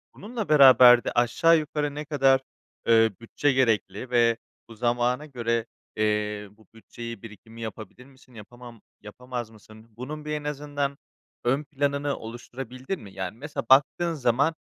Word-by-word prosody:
Bununla 220 -2 -6
beraber 130 -4 +8
de - - -2
aşağı 145 +8 +3
yukarı 150 -1 -3
ne 150 0 -5
kadar, 135 -3 +3 0.5
eee, 115 -1 +5
bütçe 145 +5 0
gerekli 115 -2 0
ve 115 -1 +3 0.3
bu 115 - -11
zamana 120 +4 0
göre, 115 -5 -2 0.3
eee, 105 -1 -1
bu 105 -1 -24
bütçeyi, 115 -1 -9
birikimi 115 +1 -12
yapabilir 110 +3 -8
misin? 130 -2 -21
Yapamam 120 +1 -13 0.2
yapamaz 120 +2 -7
mısın? 110 0 -17
Bunun 150 +5 -7
bir 150 - -4
en 150 -1 -3
azından 145 -1 -3 0.5
ön 135 +5 +1
planını 140 0 -2
oluşturabildin 125 +7 -7
mi? 100 -3 -12
Yani, 95 +2 -5
mesela 145 +3 -5
baktığın 145 +6 +4
zaman, 140 +3 +1
125 Hz, 145 wpm, -25 LUFS, 115-145 Hz, 0.5 s, beraber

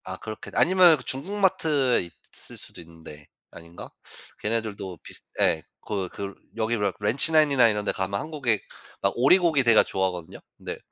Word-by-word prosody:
아 95 0 -7
그렇게 110 +2 -8
아니면 180 -3 +6
중국 170 +11 -3
마트에 150 -9 +2 0.3
있을 - - -9
수도 - - -10
있는데 80 -3 -14 0.2
아닌가? 85 +1 -12 0.5
걔네들도 105 -4 -3
비슷 - - -10 0.2
예 80 - +2 0.2
거 100 -3 -3
그르 100 -1 -6 0.2
여기 115 +1 0
레 100 -2 0
렌치 110 +10 +2
나인이나 145 -6 +5
이런 105 -2 -1
데 - - 0
가면 95 +1 -3
한국의 140 -8 -1 0.4
막 - - +1
오리고기 155 +2 +4
대가 115 -2 +6
좋아하거든요. 90 -3 -3 0.2
네 - - -6
110 Hz, 345 characters per minute, -25 LUFS, 95-145 Hz, 0.5 s, 아니면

